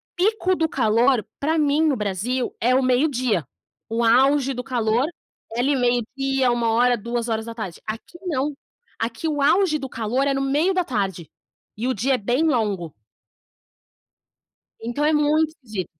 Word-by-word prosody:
pico 375 0 +1
do 320 -2 0
calor 235 -1 +2
pra 315 +3 0
mim 300 0 +2
no 280 - +2
Brasil 215 +5 -2
é 250 +2 +3
o 265 - +3
meio 255 +4 +3
dia, 235 - -1 0.4
o 230 +1 0
auge 270 +3 +4
do 250 - -5
calor 240 -1 +1 0.5
é 235 - -3
ali 280 +3 +2
meio 245 -2 +2
dia, 270 -2 +1
13h, 240 +1 +2
14h. 230 -4 -4
Aqui 225 +10 -7
não, 290 -2 -1 0.4
aqui 230 +7 -3
o 295 -2 -1
auge 310 +1 +3
do 270 - -6
calor 240 +5 -1
é 275 - +2
no 270 - -1
meio 295 +8 +1
da 365 - +1
tarde 195 - -3 0.5
e 235 +4 -3
o 260 - +1
dia 255 +6 0
é - - -1
bem 245 +9 0
longo. 210 - 0 1.9
Então 240 +6 -2
é 310 - +3
muito 305 +1 +2
de 210 -6 -4
250 Hz, 160 wpm, -22 LUFS, 225-290 Hz, 1.9 s, auge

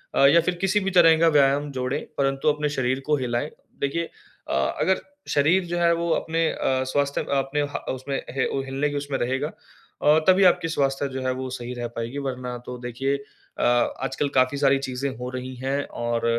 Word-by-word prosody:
अ, 140 - +5
या 165 +5 +6
फिर 175 +2 -1
किसी 195 +2 +2
भी 195 - -1
तरह 165 -1 +7
का 165 - +5
व्यायाम 145 -1 +3
जोड़ें 130 +2 -2 0.2
परंतु 135 +2 +2
अपने 150 0 0
शरीर 130 -2 0
को 150 - +3
हिलाएँ। 125 +2 -2 0.3
देखिए 140 +4 0 0.5
अ, - - -1 0.3
अगर 190 0 +2 0.3
शरीर 165 +6 +3
जो 175 0 -3
है 170 0 +4
वो 170 0 -2
अपने 165 0 0
अ, 130 0 0
स्वास्थ्य 140 0 +1
अ, 140 - -2
अपने 135 +2 -1
ह - - -3
उसमें 135 +2 -4 0.2
ह 130 - +2 0.2
हिलने 135 +2 -1
के 145 - -5
उसमें 140 -1 -2
रहेगा, 135 +5 -1 0.5
और 150 +2 +5
तभी 190 +1 +6
आपकी 180 -1 +4
स्वास्थ्य 140 -3 0
जो 130 0 -5
है 130 0 0
वो 130 0 -5
सही 125 -1 -5
रह 120 -1 -4
पाएगी 115 +4 -4
वरना 125 -1 -4
तो 125 - -6
देखिए 125 +3 -2
अ, 140 - -10 0.4
आजकल 140 +1 -1
काफ़ी 130 +2 +3
सारी 140 -1 +3
चीज़ें 135 0 -3
हो 125 +1 -5
रही 130 0 -5
हैं 135 +3 -2
और 120 0 -2
140 Hz, 200 wpm, -24 LUFS, 130-150 Hz, 0.5 s, तरह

